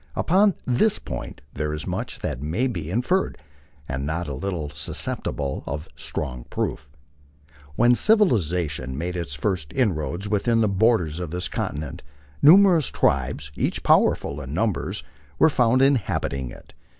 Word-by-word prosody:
Upon 195 +3 +3
this 130 - +2
point - - -7
there 75 +1 -2
is 75 - -5
much - - -4
that - - -3
may 80 - -1
be 85 -11 -3
inferred, 125 - 0 0.5
and 65 +1 -3
not 80 +4 -2
a 70 - -4
little 75 0 -4
susceptible 70 -1 -3
of 75 +3 -4
strong - - -4
proof. 75 - -3 0.9
When 120 +1 +5
civilization 90 - +2
made 90 +3 -3
its 85 -5 -3
first 80 -2 -2
inroads 95 - -1
within 110 +3 +1
the 110 - +3
borders 100 -6 +2
of 90 -3 -4
this 90 +2 -2
continent, 75 -2 -4 0.4
numerous 175 0 +7
tribes, 70 +2 0
each - - -1
powerful 70 +1 +3
in 70 +2 -6
numbers, 110 0 -1 0.3
were 160 - +5
found 125 0 +3
inhabiting 95 - 0
it. - - -14
90 Hz, 140 wpm, -24 LUFS, 75-120 Hz, 0.9 s, numerous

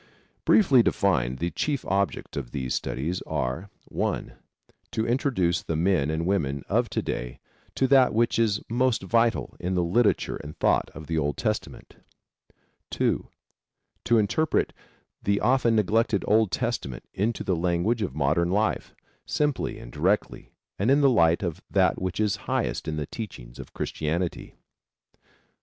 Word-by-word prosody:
Briefly 140 - +6
defined 65 - +1
the 85 +4 -2
chief 145 -3 -2
objects 100 0 -1
of 65 -4 -4
these 65 -2 -3
studies 75 +9 -2
are: 65 +11 -2 0.2
(1) - - -2 0.6
To 110 -1 0
introduce 115 - +1
the 80 - -3
men 85 -3 +2
and 80 +1 -1
women 70 -8 0
of - - +1
to - - -2
day - - -4 0.4
to 135 - +2
that 130 -1 +5
which 115 +1 +1
is 105 -3 +1
most 120 -2 +1
vital 115 +4 +1
in 90 +1 -2
the 90 - +2
literature 105 +7 +1
and 75 +1 -10
thought - - +2
of 80 - -8
the 80 +1 -1
Old 75 -2 -1
Testament. - - -4 0.9
(2) - - 0 0.8
To 120 - +4
interpret 110 +9 +1 0.5
the 100 0 +1
often 125 -2 +3
neglected 110 0 +2
Old 110 0 +4
Testament 65 -5 -3
into 105 +4 -1
the 95 - 0
language 90 +7 0
of 90 -10 -3
modern 75 +4 +1
life 105 +4 0 0.3
simply 150 -3 -1
and - - -10
directly 90 +9 -1 0.3
and 100 +6 +2
in 140 +2 +5
the 140 -2 +5
light 85 -5 +3
of 85 -4 -3
that - - +2
which 95 +1 -3
is 105 -3 +1
highest - - -1
in 80 0 -2
the 75 - -2
teachings - - -8
of - - -10
Christianity. 85 +3 -3
95 Hz, 150 wpm, -26 LUFS, 80-115 Hz, 0.9 s, Briefly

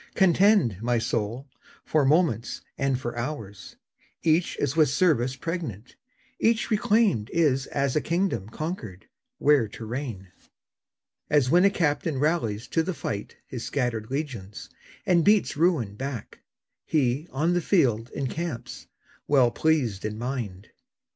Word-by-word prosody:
Contend, 190 - +4
my 120 +1 +1
soul, 115 +4 -2 0.4
for 155 -2 +2
moments 145 - +1
and 135 -2 0
for 120 -2 -5
hours; 120 -6 -6 0.5
Each 165 +1 +2
is 145 0 -1
with 155 -4 +4
service 135 -4 +2
pregnant; 140 - -5 0.4
each 230 0 +1
reclaimed 210 - +2
Is 140 -5 +1
as 140 -2 -1
a 150 - +2
kingdom 170 - -1
conquered, 115 - -6 0.3
where 145 -6 +4
to 110 +2 -9
reign. 115 -6 -5 1.0
As 140 -4 +3
when 180 +3 +5
a - - +7
captain 160 -5 0
rallies 130 -8 0
to 165 - +2
the 170 +2 -3
fight 105 -7 -5
His 125 -3 -6
scattered 120 -5 -2
legions, 125 -9 -5 0.3
and 175 -2 +4
beats 210 +2 +3
ruin 150 - +1
back, 130 0 -6 0.4
He, 140 +1 0
on 155 +6 0
the 175 - +1
field, 125 - +2
encamps, 140 0 -5 0.4
well 130 -4 +4
pleased 130 -12 +1
in 105 0 -3
mind. 115 -5 -5
135 Hz, 135 wpm, -26 LUFS, 115-165 Hz, 1.0 s, a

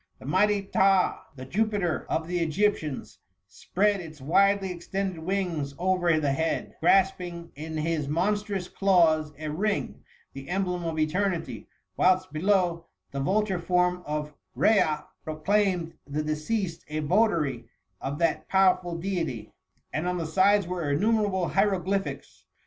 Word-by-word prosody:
The - - -13
mighty 200 +7 +2
Phtah, 195 -1 +3 0.2
the 130 -1 -8
Jupiter 205 0 -1
of 160 0 -1
the 175 0 -1
Egyp 205 +6 +2
tians, 150 -4 -7 0.3
spread 200 - 0
its 155 -3 -10
widely 195 +6 +2
extended 185 +1 -4
wings 165 -5 -2
over 175 -3 +2
the 145 -2 0
bead, 160 +3 -2
grasping 175 -1 +1
in 155 +2 -6
his 155 -2 -1
monstrous 195 +4 -1
claws 165 -7 +3
a 155 0 -5
ring, 205 +6 -2 0.3
the 135 0 -9
emblem 180 -2 -1
of 165 -1 -3
eternity; 170 +3 -1 0.3
whilst 185 -1 +2
below, 175 0 +1 0.2
the 140 - -4
vulture 190 +5 +1
form 180 +1 +1
of 150 0 -3 0.2
Rhea 155 -9 +3 0.2
proclaimed 175 +1 0
the 150 +2 -2
deceased 165 +4 -2
a 155 +1 -3
votary 150 - +1 0.3
of 140 +2 -3
that 165 0 0
powerful 185 -2 +3
deity; 165 - -3 0.4
and 155 +4 -1
on 180 0 -1
the 165 - -2
sides 195 +5 +3
were 175 -4 -3
innumerable 200 +2 +1
hieroglyphics. 195 -1 -1
175 Hz, 135 wpm, -27 LUFS, 155-195 Hz, 0.4 s, Phtah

